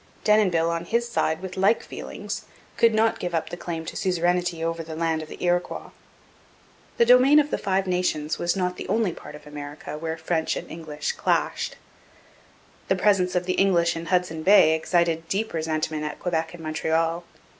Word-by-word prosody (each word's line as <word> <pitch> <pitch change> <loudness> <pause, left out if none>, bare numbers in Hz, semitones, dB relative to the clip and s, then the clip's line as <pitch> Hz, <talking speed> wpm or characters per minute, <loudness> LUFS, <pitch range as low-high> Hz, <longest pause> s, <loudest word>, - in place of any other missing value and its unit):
Denonville, 185 -6 +3
on 170 0 -3
his 235 +5 0
side, 160 -8 0
with 185 -1 -6
like 195 +4 +3
feelings, - - -7 0.3
could 230 - +4
not 220 +1 +2
give 175 -1 -3
up 160 - -2
the - - -3
claim 165 -2 -5
to - - -7
suzerainty 175 -2 0
over 165 0 -2
the 160 -1 -7
land 160 -1 0
of 155 - -9
the - - -9
Iroquois. 175 0 -1 1.1
The 235 - +5
domain 250 +4 +6
of 300 0 +3
the - - -1
Five 195 -1 0
Nations 180 -4 -1
was 175 +2 0
not 180 -1 -1
the - - -6
only 220 -4 +1
part 150 - -10
of 150 - -13
America 150 0 -7
where 160 0 -3
French 160 0 -1
and - - -6
English 155 -2 -4
clashed. - - -1 1.1
The 190 - +2
presence 185 -2 +2
of 180 0 +1
the 185 - 0
English 175 -4 +3
in 165 0 -6
Hudson 180 -3 0
Bay 185 -3 +6
excited 165 0 +1
deep 215 +5 -2
resentment 155 -1 -2
at 150 -1 -5
Quebec 165 -1 -2
and 165 - -11
Montreal. 160 +2 0
170 Hz, 185 wpm, -25 LUFS, 160-185 Hz, 1.1 s, domain